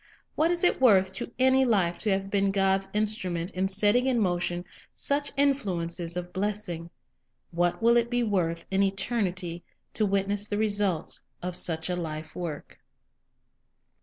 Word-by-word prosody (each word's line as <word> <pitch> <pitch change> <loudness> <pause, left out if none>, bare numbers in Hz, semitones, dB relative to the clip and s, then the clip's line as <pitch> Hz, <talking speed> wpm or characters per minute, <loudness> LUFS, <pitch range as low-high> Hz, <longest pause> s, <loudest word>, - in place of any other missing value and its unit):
What 320 +2 +2
is 350 0 0
it 355 - +3
worth 190 -6 +5
to 195 - -5
any 260 +1 +4
life 195 -8 +1
to 215 - -1
have 195 0 -1
been 200 -1 +2
God's 195 0 +1
instrument 205 -5 -2
in 190 +1 -1
setting 210 +6 +3
in 255 -2 +2
motion 175 -2 -1 0.3
such 285 0 -1
influences 180 -11 0
of 180 0 -5
bless 210 +2 -2
ing? 170 -1 -6 0.6
What 175 +5 0
will 235 +1 +5
it 235 0 +1
be 245 0 +1
worth 170 -6 -1
in 195 0 +2
eternity 190 -4 -1 0.3
to 215 - +1
witness 200 +1 0
the 205 - -2
results 205 -6 0 0.2
of 180 0 -3
such 160 -3 0
a 180 - -1
life 160 -2 -6
work? 150 - -6
195 Hz, 160 wpm, -27 LUFS, 175-215 Hz, 0.6 s, worth